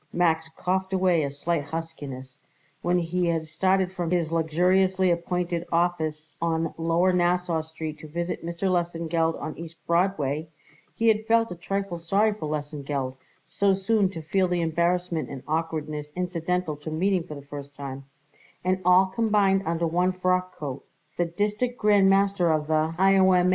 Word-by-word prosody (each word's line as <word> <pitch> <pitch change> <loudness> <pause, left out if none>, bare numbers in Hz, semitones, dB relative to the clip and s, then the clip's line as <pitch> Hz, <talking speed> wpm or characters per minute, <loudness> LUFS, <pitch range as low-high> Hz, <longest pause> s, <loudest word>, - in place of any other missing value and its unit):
Max 160 -2 +1
coughed 190 +1 -1
away 185 -3 +3
a 140 - -1
slight 150 +2 -1
huskiness. 145 -5 -7 0.4
When 175 +1 +2
he 175 +1 0
had 165 -1 0
started 185 +3 +1
from 175 -3 -3
his 170 -2 0
luxuriously 180 +3 +2
appointed 170 0 -1
office 160 -3 -1
on 165 -1 0
lower 170 +3 +2
Nassau 175 -2 +1
Street 160 -1 -7
to 155 - -10
visit 170 +3 -3
Mr. 170 +2 -6
Lesengeld 170 -2 0
on 155 - -5
East 165 0 -9
Broadway, 165 -4 +1 0.5
he 230 - +1
had 220 0 +3
felt 230 -1 +3
a - - -4
trifle 195 0 -3
sorry 200 +6 +2
for 180 -7 -5
Lesengeld, 145 -3 -3 0.3
so 200 -1 +2
soon 195 0 +2
to 165 -4 -7
feel 185 +4 +1
the 175 -1 0
embarrassment 170 0 0
and 135 -2 -7
awkwardness 155 -2 -2
incidental 180 -2 -1
to 150 +2 -7
meeting 185 +4 +1
for 165 -2 -8
the 140 -1 -10
first 140 0 -9
time, 135 -1 -7 0.6
and 185 +1 +1
all 180 +2 +6
combined 195 -1 +2
under 170 0 0
one 180 +3 +1
frockcoat, 185 -7 -1 0.4
the 175 - +2
District 210 +8 -1
Grand 205 -2 +4
Master 195 -3 +3
of 155 -1 +1
the 155 +1 +1
I.O.M. 190 -1 +5
170 Hz, 160 wpm, -26 LUFS, 160-185 Hz, 0.6 s, all